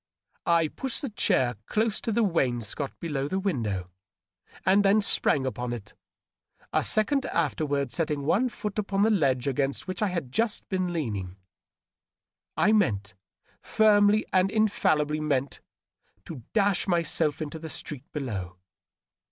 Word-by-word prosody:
I 170 -2 +4
pushed 265 - -4
the 270 - -3
chair 130 - +1
close 215 0 0
to 230 - -2
the 230 +2 +2
wainscot 135 - -1
below 145 -5 -2
the 190 - -2
window, 110 - -2 0.7
and 195 +2 +5
then 200 +2 +5
sprang 145 -8 +2
upon 125 -2 -3
it, 115 -4 -8 0.8
a - - +2
second 270 +6 +2
after 155 -1 -1
ward 140 -3 -1
setting 150 0 -1
one 225 - +2
foot 210 -3 -4
upon 200 -1 0
the 220 - +4
ledge 135 - +1
against 140 +4 -1
which 185 +3 -4
I 210 - +3
had 170 -9 -3
just 225 - -1
been 185 -2 -1
leaning. 105 - -3 1.2
I 215 - +4
meant 105 - +1 0.3
— - - -37
^firmly 210 -1 +5
and 185 0 +4
infallibly 155 -8 +1
meant 140 -3 -1 0.3
— 100 - -42
^to 150 -7 -8
dash 205 -3 +2
myself 165 -3 +1
into 155 0 -5
the 160 0 -7
street 145 -2 -6
below. 100 - -5
160 Hz, 150 wpm, -27 LUFS, 135-205 Hz, 1.2 s, and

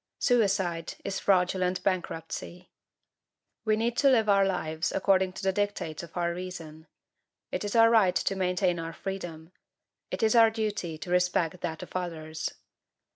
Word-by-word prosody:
Suicide 195 -9 +1
is 195 -1 -2
fraudulent 185 -1 +1
bankruptcy. 180 -1 -3 0.9
We 215 -1 +3
need 230 +2 0
to 280 - +5
live 225 -5 +4
our 200 -1 +5
lives 160 -4 -1
according 190 -2 +2
to - - -8
the 190 0 +2
dictates 205 -6 -2
of 170 +1 -10
our 170 -1 0
reason. 170 -3 -8 0.6
It - - -2
is 205 +2 -3
our 230 0 +7
right 205 -6 +4
to 195 - 0
maintain 180 -1 +1
our 165 0 -5
freedom. 175 -4 -6 0.6
It - - -3
is 220 - +4
our 230 -2 +7
duty 210 -7 -3
to 175 +3 -7
respect 180 -1 +1
that 160 -1 -4
of - - -12
others. 160 -3 -3
185 Hz, 155 wpm, -28 LUFS, 170-205 Hz, 0.9 s, our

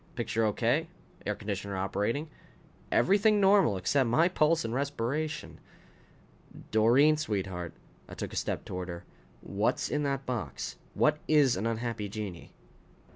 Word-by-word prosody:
Picture 115 -1 -1
okay. 120 +9 +1 0.4
Air 105 - 0
conditioner 100 -2 -4
operating. 105 +10 -1 0.6
Everything 205 +2 +4
normal 195 - +4
except 125 +7 +1
my 160 +9 +4
pulse 165 -4 +2
and 115 - -3
respiration. 140 +3 -2 1.1
"Doreen, 125 +8 +5
sweetheart 95 - -3 0.2
" - - -28
I - - -8
took - - -5
a - - -6
step - - -2
toward 90 0 -5
her 85 0 -7 0.4
"what's 100 +3 -1
in 150 - 0
that 140 -1 -1
box? 125 -4 -4 0.2
What 150 0 +3
is 145 -5 +4
an 100 +5 -1
unhappy 115 -2 -3
genii?" 100 -4 -6
115 Hz, 135 wpm, -30 LUFS, 100-150 Hz, 1.1 s, Doreen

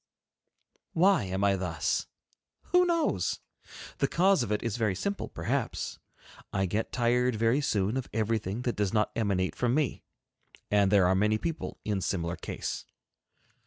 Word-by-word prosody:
Why 180 - +4
am 95 +1 -2
I 100 -1 +4
thus? 90 -4 -1 0.6
Who 360 0 +5
knows? 335 -2 +1 0.6
The - - +3
cause 190 -2 +3
of 105 - -2
it 105 - 0
is 115 -3 -1
very 110 -5 +1
simple 200 - -3
perhaps. - - -3 0.5
I 95 0 +1
get 105 +5 -2
tired 125 0 +2
very 115 +6 +2
soon 105 -2 0
of 130 - -4
everything 110 0 -1
that 120 - -1
does 100 -1 0
not 105 -1 +2
emanate 100 -5 0
from 125 0 +1
me. 150 -5 0 0.7
And 100 -2 +4
there 100 -3 +5
are 90 - +4
many 105 +3 +2
people 165 +6 -4
in 105 -3 -1
similar 85 -2 -1
case. 85 - -5
110 Hz, 155 wpm, -29 LUFS, 95-125 Hz, 0.7 s, Who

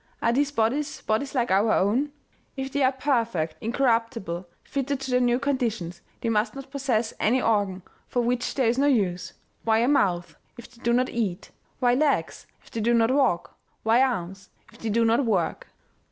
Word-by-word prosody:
Are 230 - +2
these 280 +3 +2
bodies, 280 +3 -1
bodies 225 +7 -1
like 240 -5 +1
our 205 +3 +3
own? 245 +10 +1 0.5
If 265 0 -4
they 285 - -1
are 260 -1 +4
perfect, 230 - 0
incorruptible, 230 -7 -1
fitted 275 0 -2
to 265 -1 -4
their 250 - +4
new 245 -1 +3
conditions, 230 -11 -2 0.2
they 230 - -1
must 220 +4 0
not 275 0 -9
possess 250 -5 -1
any 245 +5 +3
organ 200 -6 0 0.2
for 245 - 0
which 245 +1 -1
there 265 - +2
is 235 +3 +2
no 285 - +4
use. 185 -8 0 0.3
Why 220 -1 +3
a 235 +2 +2
mouth, 185 -11 +1 0.2
if 240 0 -12
they 240 -1 -20
do 235 - +1
not 255 +2 +2
eat? 205 -7 -3 0.3
Why 245 -2 +3
legs, 270 - 0 0.2
if - - -20
they 225 - -3
do 235 +2 +3
not 230 +1 +3
walk? 260 -11 +1 0.3
Why 225 +3 +4
arms, 195 -7 -2 0.2
if - - -17
they 225 - -3
do 230 +2 +2
not 230 +4 +3
work? 190 -9 -1
235 Hz, 190 wpm, -25 LUFS, 210-265 Hz, 0.5 s, are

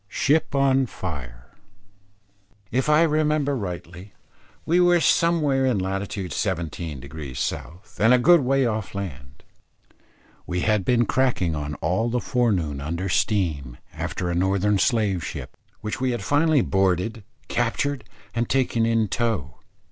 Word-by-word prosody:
SHIP 145 +7 +1
ON 135 -1 +3
FIRE. 65 - -7 1.2
If 130 +5 0
I 150 +2 +5
remember 150 -2 +1
rightly, 90 -2 -7 0.5
we 175 +2 +3
were 175 -1 +5
somewhere 155 -6 +2
in 125 -5 +1
lat. 95 +1 -1
17° 80 -8 -4
South, 85 - -5
and 110 +3 +5
a 125 - +7
good 170 +7 +6
way 135 +1 +2
off 110 -4 -3
land. 70 -10 -7 1.0
We 90 0 -2
had 105 -1 +2
been 120 +2 +2
cracking 120 -11 +1
on 75 0 -4
all 95 +11 0
the 125 +1 0
forenoon 95 - 0
under 85 +6 -3
steam, 80 - 0 0.2
after 90 -1 -3
a - - -1
Northern 95 +3 +1
slave 105 -7 +1
ship, - - -7 0.3
which 105 +4 -4
we 130 - +1
had 120 -4 -2
finally 150 +2 +3
boarded, 95 +2 0 0.2
captured, 130 +3 -1 0.3
and 120 0 -1
taken 120 -4 +1
in 115 -1 +2
tow. 100 - -2
105 Hz, 135 wpm, -24 LUFS, 90-130 Hz, 1.2 s, a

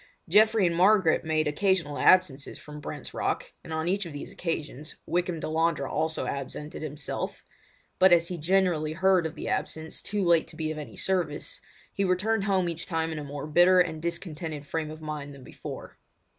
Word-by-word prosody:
Geoffrey 215 +3 +5
and 170 -1 +1
Margaret 185 -2 +4
made 155 -1 +1
occasional 165 -1 +1
absences 175 -7 +3
from 150 0 -10
Brent's - - -7
Rock, - - -2
and - - -10
on 160 +1 -1
each 195 0 0
of 160 - -9
these 145 - -7
occasions 155 -3 -4
Wykham 175 -1 -1
Delandre 160 -2 0
also 160 +2 -1
absented 140 +2 -5
himself; 150 -2 -5 0.6
but 190 0 +7
as 170 -1 +5
he 180 -2 -4
generally 170 -2 +2
heard 185 -1 +3
of 160 - -10
the - - -6
absence 160 0 -3
too 205 -2 -1
late 170 -2 +4
to - - -13
be 155 -1 -2
of 155 - -5
any 150 - -8
service, 175 -6 -2 0.3
he 200 - 0
returned 195 +3 +1
home 190 -3 +2
each 170 -1 -4
time 165 -1 -1
in 160 - -4
a - - -5
more 145 0 -6
bitter 175 +4 +5
and 160 -3 +1
discontented 160 -3 -4
frame 155 +1 -3
of 155 0 -9
mind 145 -2 -5
than 135 - -13
before. - - -9
160 Hz, 185 wpm, -28 LUFS, 155-185 Hz, 0.6 s, but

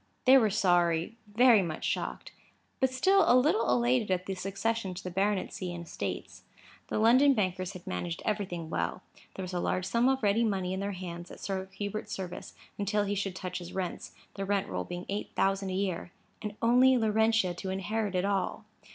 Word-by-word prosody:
They 260 +1 +8
were 230 -5 +5
sorry; 175 -2 +2
very 225 +1 +5
much 165 -4 -4
shocked; - - -3 0.5
but 265 - +3
still 380 +9 +4
a 250 - +7
little 310 - +3
elated 240 -2 +2
at 185 -1 0
the 195 - -3
succession 195 +1 -2
to 180 - -7
the 180 - -5
baronetcy 195 -1 -1
and 170 0 -7
estates. - - -5 0.5
The - - -2
London 255 +6 +5
bankers 185 -2 -1
had 180 -2 -10
managed 90 -2 -4
everything 185 -6 -2
well. - - -2 0.3
There 190 - -5
was 185 0 -6
a 175 - 0
large 180 +1 -1
sum 235 +5 +2
of 265 -2 0
ready 210 +3 +3
money 190 -4 0
in 190 - -3
their 200 +1 -2
hands, 175 -1 -7
at - - -11
Sir 190 -1 -4
Hubert's 210 +2 -4
service, 185 -2 -6 0.2
until 205 +1 +1
he 205 0 -1
should 195 -2 -2
touch 180 -1 -4
his 175 -1 -9
rents, 185 -2 -4 0.2
the 195 - -4
rent 200 0 0
roll 90 -1 -3
being 175 0 -6
eight 200 +1 -4
thousand 195 0 +1
a - - -3
year. 185 -3 -2 0.3
And 210 -1 -5
only 250 +2 +6
Laurentia 220 -3 +2
to 190 +2 -6
inherit 200 +2 -2
it 180 +1 +1
all! 200 +2 -1
195 Hz, 195 wpm, -30 LUFS, 180-220 Hz, 0.5 s, They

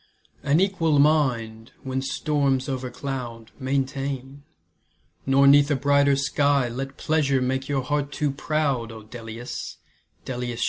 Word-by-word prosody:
An 145 +3 +2
equal 175 -6 +2
mind, 125 -7 +1
when 130 0 -2
storms 135 -2 0
o'ercloud, 125 -3 -5
Maintain, 135 0 -3 0.9
nor 135 +1 +5
'neath 140 +1 +6
a 145 - +2
brighter 140 +1 +3
sky 140 -1 +2
Let 135 +3 -5
pleasure 145 -4 +1
make 130 +2 -1
your 135 -2 0
heart 145 +1 -1
too 145 0 -1
proud, 140 -5 -1
O 110 -1 -10
Dellius, 115 +2 -7 0.5
Dellius! 120 -2 -4
135 Hz, 125 wpm, -24 LUFS, 125-145 Hz, 0.9 s, neath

